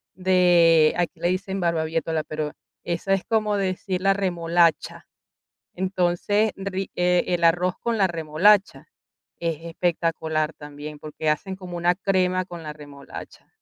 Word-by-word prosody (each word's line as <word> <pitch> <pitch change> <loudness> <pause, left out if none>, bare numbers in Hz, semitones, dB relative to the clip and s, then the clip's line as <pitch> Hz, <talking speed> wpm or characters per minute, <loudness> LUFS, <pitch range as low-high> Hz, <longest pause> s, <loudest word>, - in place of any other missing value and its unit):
de, 175 -4 +4
aquí 175 -1 -2
le - - 0
dicen 190 +2 -2
barbaviétola, 165 -2 -1
pero 155 -1 -4 0.3
esa 175 +3 -1
es 195 - 0
como 215 -2 +1
decir 185 -1 -2
la 195 +1 +4
remolacha. 170 -3 +1 0.7
Entonces, 190 +3 0
ri 195 -1 -4
eh, 180 0 +2
el 175 -1 0
arroz 175 +2 +3
con 235 -1 -1
la 195 - +4
remolacha 175 +5 +2 0.5
es 165 -2 -2
espectacular 165 -2 -1
también, 150 0 -9
porque 155 0 -5
hacen 185 +5 -1
como 180 -2 -8
una 175 +1 +2
crema 185 -1 +1
con 175 -2 -9
la 150 -1 -6
remolacha. 145 -2 -11
175 Hz, 135 wpm, -24 LUFS, 160-190 Hz, 0.7 s, de